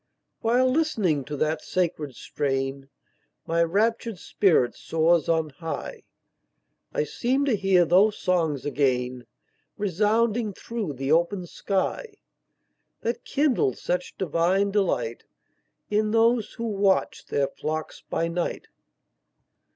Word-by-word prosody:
While 245 +3 +3
listening 215 - +1
to 145 +1 -5
that 155 +2 0
sacred 155 -7 -2
strain, 135 0 -3 0.6
My 165 +1 +1
raptured 220 +5 +1
spirit 170 -11 +2
soars 165 0 +1
on 160 -2 +2
high; 160 +3 -6 0.9
I - - 0
seem 260 - 0
to 265 -6 +2
hear 190 -3 +3
those 195 +6 +4
songs 165 -7 0
again 125 -4 0 0.5
Resounding 210 +3 +1
through 215 -6 -4
the 135 +2 -3
open 175 +3 +2
sky, 210 - -2 0.9
That 235 +1 -2
kindled 265 - +1
such 180 0 -3
divine 185 +3 +1
delight, 195 - 0 0.7
In 215 +1 +2
those 225 0 +2
who 235 - -5
watched 200 -3 +1
their 140 -1 +1
flocks 155 +2 -5
by 165 - 0
night. 170 +1 -3
180 Hz, 110 wpm, -25 LUFS, 150-215 Hz, 0.9 s, those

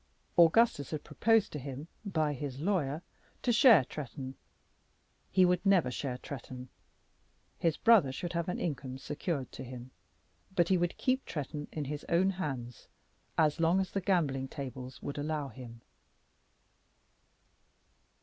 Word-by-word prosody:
Augustus 170 - +5
had 155 -2 -4
proposed 225 +7 +2
to 150 - -4
him 140 +3 -7 0.2
by 160 -7 0
his 135 -1 -5
lawyer 160 -3 0 0.4
to 245 - +3
share 230 - +7
Tretton. 135 -2 -6 1.0
He 185 -1 +5
would 180 0 +2
never 185 -10 +4
share 125 0 -3
Tretton. 130 -1 -8 0.9
His 165 -3 +1
brother 220 - +5
should 170 +6 -5
have 170 +1 -1
an 180 - -2
income 130 -5 -3
secured 145 0 -3
to - - -8
him, 125 0 -9 0.6
but 170 -2 +3
he 190 - +4
would 175 0 -1
keep 260 0 +1
Tretton 145 0 -5
in 150 -2 -3
his 145 +2 -5
own 185 +3 +3
hands, 135 -10 -5 0.5
as 155 0 +3
long 165 +3 +4
as 190 -1 -1
the 195 - -1
gambling 150 -9 +1
tables 130 -2 -7
would 145 0 -4
allow 150 -1 -2
him. 115 -1 -11
150 Hz, 140 wpm, -32 LUFS, 135-180 Hz, 1.0 s, share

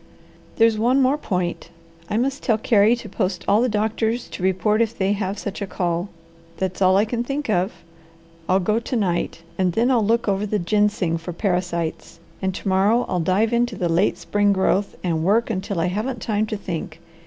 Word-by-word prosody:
There's 225 -1 +3
one 245 +4 +3
more 265 +1 +3
point: 180 - -3 0.4
I 210 - 0
must 270 +3 -1
tell 225 -3 +2
Carey 220 0 +4
to 240 - -9
post 185 -3 -2
all 205 +3 +4
the 250 - +2
doctors 220 +2 -1
to - - -8
report 190 +4 +2
if 230 -1 -1
they 195 +1 +1
have 200 0 -3
such 200 +1 -5
a 200 - -2
call. 175 0 -2 0.5
That's 190 0 -3
all 185 0 +5
I 205 - +4
can 235 +2 -2
think 275 -1 -3
of. 185 +1 +1 0.8
I'll 185 +1 +4
go 210 +4 +1
to 240 +2 -4
night, 175 -5 -1 0.2
and 180 -2 +2
then 235 +7 +2
I'll 235 -4 +3
look 230 +3 +1
over 200 +1 0
the 210 - 0
ginseng 205 -3 +1
for 170 +2 -6
parasites, 175 -3 -2 0.2
and 190 -1 0
to - - -6
morrow 200 +6 +3
I'll 180 - -1
dive 195 +7 +1
into 240 -1 +1
the 180 -3 -1
late 175 +5 +2
spring 205 0 +1
growth 195 +1 +1
and 165 -3 0
work 225 +6 +2
until 195 -2 -3
I 165 - +1
haven't 215 +7 -2
time 215 -1 -1
to 215 - -3
think. 165 -4 -6
205 Hz, 200 wpm, -22 LUFS, 185-225 Hz, 0.8 s, all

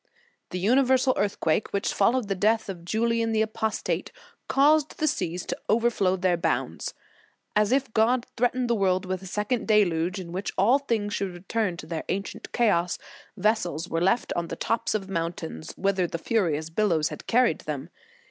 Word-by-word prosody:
"The 180 - -4
universal 255 +6 +3
earthquake 200 -2 0
which 200 - -1
followed 230 +3 +2
the 200 - 0
death 215 +3 +1
of 175 -3 -6
Julian 230 +4 0
the 220 0 +3
Apostate, 220 0 -2 0.4
caused 295 +2 +3
the 310 - 0
seas 180 - -1
to - - -3
over 235 +2 +3
flow 190 -4 +1
their 180 -1 +1
bounds. 170 - -2 0.6
As 210 +1 +3
if 265 -3 +1
God 235 +3 +3
threatened 245 +1 +1
the 235 - +2
world 190 -3 +1
with 185 0 -3
a 190 - -9
second 210 +5 -1
deluge, 185 -4 +2
in 170 -2 -7
which 190 +3 -3
all 230 +9 +4
things 220 -7 -1
should 190 -3 -2
return 185 0 -2
to 155 - -8
their 160 0 -4
ancient 195 +2 -4
chaos, 180 -7 +2 0.4
vessels 185 -5 0
were 165 - -1
left 190 +7 +2
on 170 -1 -1
the - - -5
tops 230 -1 -1
of 195 -3 -2
mountains, 165 - -4
whither 195 -2 +1
the 170 - -4
furious 165 -5 0
billows 165 -5 +1
had - - -9
carried 250 +2 +3
them. - - -5
205 Hz, 175 wpm, -26 LUFS, 180-230 Hz, 0.6 s, all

